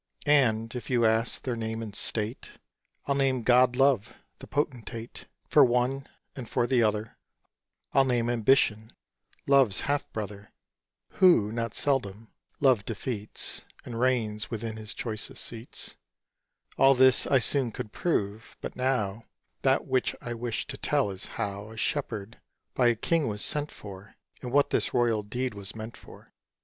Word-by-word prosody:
And 115 Hz, -7 st, +3 dB
if 125 Hz, -, -6 dB
you 120 Hz, -3 st, +3 dB
ask 110 Hz, +1 st, +1 dB
their 125 Hz, -2 st, -2 dB
name 110 Hz, 0 st, -3 dB
and 105 Hz, -2 st, -7 dB
state, 110 Hz, +2 st, -2 dB, 0.5 s
I'll 140 Hz, -, +1 dB
name 135 Hz, -3 st, +1 dB
god 125 Hz, +1 st, +5 dB
Love, 135 Hz, -5 st, +2 dB, 0.2 s
the -, -, -10 dB
potentate, 120 Hz, -5 st, -4 dB, 0.2 s
For 150 Hz, -, +6 dB
one; 125 Hz, +2 st, +1 dB, 0.3 s
and 125 Hz, -4 st, -7 dB
for 120 Hz, -, +1 dB
the 125 Hz, 0 st, +2 dB
other, 110 Hz, 0 st, 0 dB, 0.8 s
I'll 135 Hz, -, +6 dB
name 120 Hz, -2 st, +1 dB
Ambition, 115 Hz, -2 st, +2 dB, 0.5 s
Love's 135 Hz, -7 st, +4 dB
half 145 Hz, 0 st, -1 dB
brother, 105 Hz, -2 st, -6 dB, 0.6 s
Who, 170 Hz, -, +5 dB
not 115 Hz, -1 st, -3 dB
seldom, 115 Hz, -6 st, -1 dB, 0.3 s
Love 130 Hz, -7 st, +4 dB
defeats, 110 Hz, 0 st, -4 dB, 0.2 s
And 115 Hz, -2 st, -5 dB
reigns 115 Hz, -4 st, 0 dB
within 115 Hz, -1 st, -4 dB
his 110 Hz, 0 st, -5 dB
choicest 110 Hz, -3 st, -3 dB
seats, 115 Hz, +1 st, -6 dB, 0.8 s
All 135 Hz, 0 st, +7 dB
this 130 Hz, 0 st, +5 dB
I 135 Hz, -, +4 dB
soon 130 Hz, 0 st, +1 dB
could 105 Hz, -, -6 dB
prove; 110 Hz, -, -2 dB
but -, -, -6 dB
now 115 Hz, -5 st, -1 dB, 0.4 s
That 135 Hz, 0 st, +2 dB
which 130 Hz, -2 st, 0 dB
I 120 Hz, -, -5 dB
wish 120 Hz, -1 st, -3 dB
to -, -, -7 dB
tell 100 Hz, -, +1 dB
is 95 Hz, -, -6 dB
how 105 Hz, -1 st, -4 dB
A 110 Hz, -, -11 dB
Shepherd 110 Hz, -3 st, -3 dB, 0.3 s
by 125 Hz, -, +3 dB
a 120 Hz, -, +4 dB
King 160 Hz, +6 st, +1 dB
was 105 Hz, -1 st, 0 dB
sent 150 Hz, 0 st, 0 dB
for, 100 Hz, -1 st, -11 dB, 0.3 s
And 125 Hz, -, -5 dB
what 145 Hz, +2 st, +3 dB
this -, -, 0 dB
royal 115 Hz, -3 st, +2 dB
deed 125 Hz, +4 st, -3 dB
was 100 Hz, 0 st, -6 dB
meant 110 Hz, +1 st, -7 dB
for. -, -, -16 dB
115 Hz, 155 wpm, -28 LUFS, 110-130 Hz, 0.8 s, All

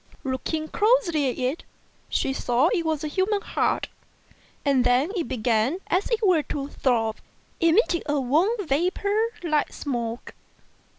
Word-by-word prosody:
Looking 295 Hz, +4 st, -2 dB
closely 360 Hz, -, +2 dB
at 245 Hz, -, -4 dB
it, 260 Hz, +5 st, -2 dB, 0.5 s
she 270 Hz, -, 0 dB
saw 255 Hz, +4 st, +2 dB
it 350 Hz, -6 st, 0 dB
was 315 Hz, -2 st, -1 dB
a -, -, -1 dB
human 390 Hz, +6 st, 0 dB
heart; -, -, 0 dB, 0.8 s
and 275 Hz, -3 st, +3 dB
then 250 Hz, +7 st, +2 dB
it 345 Hz, -5 st, -1 dB
began 235 Hz, +3 st, +1 dB
as 370 Hz, +3 st, +1 dB
it 455 Hz, -2 st, +1 dB
were 360 Hz, -5 st, +4 dB
to 285 Hz, -1 st, -5 dB
throb, 225 Hz, -6 st, 0 dB, 0.4 s
emitting 340 Hz, +1 st, +3 dB
a 295 Hz, -1 st, +1 dB
warm 295 Hz, -, +2 dB
vapour 380 Hz, +7 st, 0 dB, 0.2 s
like 305 Hz, -3 st, +1 dB
smoke. 240 Hz, -4 st, -4 dB
300 Hz, 140 wpm, -25 LUFS, 260-360 Hz, 0.8 s, were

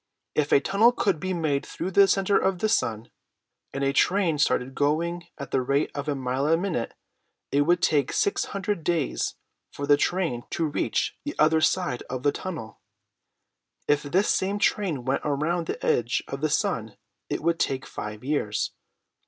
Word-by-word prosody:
If 150 Hz, -1 st, 0 dB
a -, -, +7 dB
tunnel 210 Hz, -, +4 dB
could 195 Hz, -8 st, 0 dB
be 185 Hz, +4 st, -3 dB
made 155 Hz, -6 st, 0 dB
through 190 Hz, -, -5 dB
the 200 Hz, +1 st, +6 dB
center 195 Hz, +1 st, +2 dB
of 190 Hz, -1 st, +2 dB
the 215 Hz, -, 0 dB
sun, 115 Hz, -, 0 dB, 0.6 s
and 140 Hz, -, -3 dB
a 135 Hz, 0 st, +1 dB
train 180 Hz, -2 st, +2 dB
started 135 Hz, -3 st, +1 dB
going 170 Hz, +5 st, 0 dB
at 140 Hz, -, -7 dB
the 135 Hz, -, +2 dB
rate 140 Hz, +3 st, 0 dB
of 145 Hz, 0 st, -5 dB
a 145 Hz, -, 0 dB
mile 130 Hz, +1 st, -1 dB
a 165 Hz, +1 st, +4 dB
minute, 175 Hz, -10 st, -2 dB, 0.6 s
it 140 Hz, -, +3 dB
would 175 Hz, 0 st, +3 dB
take 145 Hz, -4 st, +2 dB
six 200 Hz, -, +1 dB
hundred 195 Hz, -3 st, -3 dB
days 165 Hz, -4 st, -1 dB, 0.4 s
for 145 Hz, -, -5 dB
the 145 Hz, 0 st, +5 dB
train 170 Hz, -11 st, 0 dB, 0.2 s
to 165 Hz, -, +1 dB
reach 150 Hz, -, -1 dB
the 295 Hz, -, -5 dB
other 160 Hz, +1 st, +4 dB
side 170 Hz, -8 st, +1 dB
of 130 Hz, 0 st, -4 dB
the 145 Hz, -, +4 dB
tunnel. 160 Hz, -, -7 dB, 1.1 s
If 145 Hz, 0 st, +3 dB
this 180 Hz, +8 st, +1 dB
same 195 Hz, +2 st, +1 dB
train 180 Hz, -, 0 dB
went 135 Hz, +1 st, 0 dB
around 155 Hz, +4 st, -1 dB
the -, -, -4 dB
edge 120 Hz, 0 st, +1 dB
of 135 Hz, -, -5 dB
the 155 Hz, -, +1 dB
sun 110 Hz, -7 st, -1 dB, 0.3 s
it -, -, -2 dB
would 170 Hz, 0 st, +1 dB
take 135 Hz, 0 st, -1 dB
five 105 Hz, +1 st, -7 dB
years. 130 Hz, -7 st, -1 dB
155 Hz, 180 wpm, -26 LUFS, 135-180 Hz, 1.1 s, a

